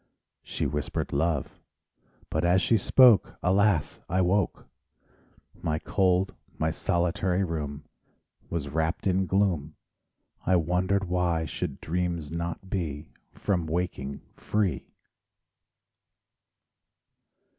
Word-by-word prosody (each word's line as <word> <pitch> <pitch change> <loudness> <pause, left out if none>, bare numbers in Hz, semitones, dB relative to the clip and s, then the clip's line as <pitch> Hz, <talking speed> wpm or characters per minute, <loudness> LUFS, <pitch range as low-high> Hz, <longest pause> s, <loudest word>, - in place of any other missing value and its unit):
She - - -3
whispered 75 0 -2
love. 75 0 -1 0.7
But 80 - 0
as 90 +2 +4
she 115 - +4
spoke, 115 +1 +5
Alas, 95 -2 +2
I 90 +2 +1
woke! 95 +2 +1 1.0
My 80 -1 0
cold, 95 +2 +1 0.2
my 80 +1 +1
solitary 90 +3 0
room 75 -4 -4 0.7
Was 75 -5 -3
wrapped 80 +3 -1
in 95 0 +2
gloom; 85 -7 +1 0.7
I 95 - +3
wondered 90 +4 +1
why 90 -3 0
should 75 - -4
dreams 85 -2 -2
not 85 +2 -4
be 80 -6 -3 0.3
From 90 -5 -1
waking 80 -5 -3
free. 105 -4 -1
85 Hz, 100 wpm, -27 LUFS, 80-95 Hz, 1.0 s, spoke